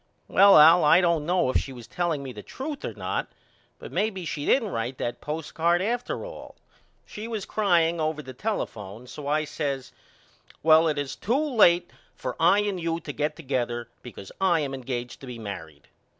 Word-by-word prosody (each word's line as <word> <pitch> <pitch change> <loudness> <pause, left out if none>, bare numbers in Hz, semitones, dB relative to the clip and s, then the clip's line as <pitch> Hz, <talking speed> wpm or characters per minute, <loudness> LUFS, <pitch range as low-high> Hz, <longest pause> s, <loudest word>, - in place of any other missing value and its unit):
Well 200 +1 +7
Al 160 +3 +8
I 150 - +6
don't 170 -4 +1
know 175 -7 +2
if - - +2
she 135 - -4
was 120 -3 -10
telling 160 +2 -2
me 130 -2 -7
the 105 - -8
truth 275 - -6
or - - -5
not - - -3 0.5
but - - -10
may 215 - +1
be 190 -4 -7
she 150 -2 -4
didn't 230 -6 +3
write 120 -2 -3
that 120 - -4
postcard 165 +3 0
after 240 - -2
all. - - -10 0.5
She 215 +2 -8
was 220 -4 -4
crying 170 -5 +2
over 155 -1 -2
the 130 - -9
telephone 115 - -4
so 140 +3 -8
I 155 +1 +1
says 140 -3 -4 0.7
Well 160 +1 +6
it 155 - 0
is 145 -2 -3
too 235 +7 0
late 205 - +4 0.2
for 125 - -5
I 175 +5 +5
and 200 -3 -2
you 165 0 -1
to 150 -3 -7
get 150 +1 -1
together 120 -6 -3
because 100 -5 -10
I 175 -4 +3
am 140 -2 -3
engaged 125 -2 -5
to 135 - -10
be 125 -1 -7
married. 80 -9 -8
155 Hz, 195 wpm, -26 LUFS, 130-180 Hz, 0.7 s, Al